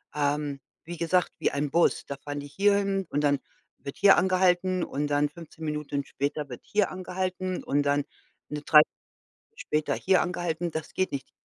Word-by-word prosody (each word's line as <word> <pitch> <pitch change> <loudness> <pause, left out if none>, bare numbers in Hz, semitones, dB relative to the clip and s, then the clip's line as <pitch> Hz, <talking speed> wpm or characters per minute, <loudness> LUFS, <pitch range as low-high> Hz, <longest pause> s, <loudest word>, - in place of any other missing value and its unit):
ähm, 145 -1 -1 0.2
wie 175 0 -7
gesagt, 180 +2 +1
wie - - +2
ein 140 0 -2
Bus. 170 +1 +2
Da 140 - -5
fahren 145 0 -6
die 145 - -8
hierhin 195 +2 +1
und 145 - 0
dann 145 -2 +2 0.4
wird 140 - -8
hier 200 -1 +7
angehalten 185 -1 +2
und 145 +1 -2
dann 145 0 +2
15 160 0 -10
Minuten 150 -2 -3
später 145 +1 -3
wird 125 - -8
hier 210 -1 +1
angehalten 185 0 -3
und 145 +1 +1
dann 145 0 +2 0.5
'ne 150 0 -4
3/4 150 0 +6 0.5
Stunde - - -34
später 150 0 -1
hier 190 -1 +3
angehalten. 175 -1 -2
Das 160 -1 -5
geht 185 - 0
nicht. 140 -1 -5
155 Hz, 180 wpm, -27 LUFS, 145-185 Hz, 0.5 s, hier